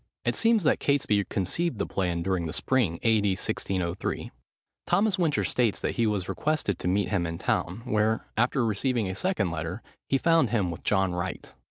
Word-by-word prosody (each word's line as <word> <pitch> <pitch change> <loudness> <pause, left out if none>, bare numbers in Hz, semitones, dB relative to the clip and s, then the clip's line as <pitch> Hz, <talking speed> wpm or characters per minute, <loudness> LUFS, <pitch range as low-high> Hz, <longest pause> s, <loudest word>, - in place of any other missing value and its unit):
It - - +1
seems 225 -3 +4
that 155 - +3
Catesby 120 -8 +2
conceived 115 - -1
the - - -1
plan 90 -3 -1
during 90 -3 -1
the 80 - -5
spring, 115 -11 +1
A.D. 110 -3 +3
1603. 90 -1 -2 0.6
Thomas 195 +1 +2
Winter 160 -4 +1
states 120 -5 +1
that - - 0
he 115 -2 +1
was 100 -4 -1
requested 100 - -1
to - - -3
meet 100 +3 +1
him 90 -5 0
in 85 0 -4
town; 90 +7 -1
where, 110 -1 +1
after 120 +2 +2
receiving 115 +1 0
a 95 - -3
second 140 - 0
letter, 85 +5 -4 0.3
he 135 - +3
found 165 -3 +3
him 100 -6 0
with 85 - -8
John 95 -3 +1
Wright. 90 +1 -5
105 Hz, 185 wpm, -27 LUFS, 90-130 Hz, 0.6 s, seems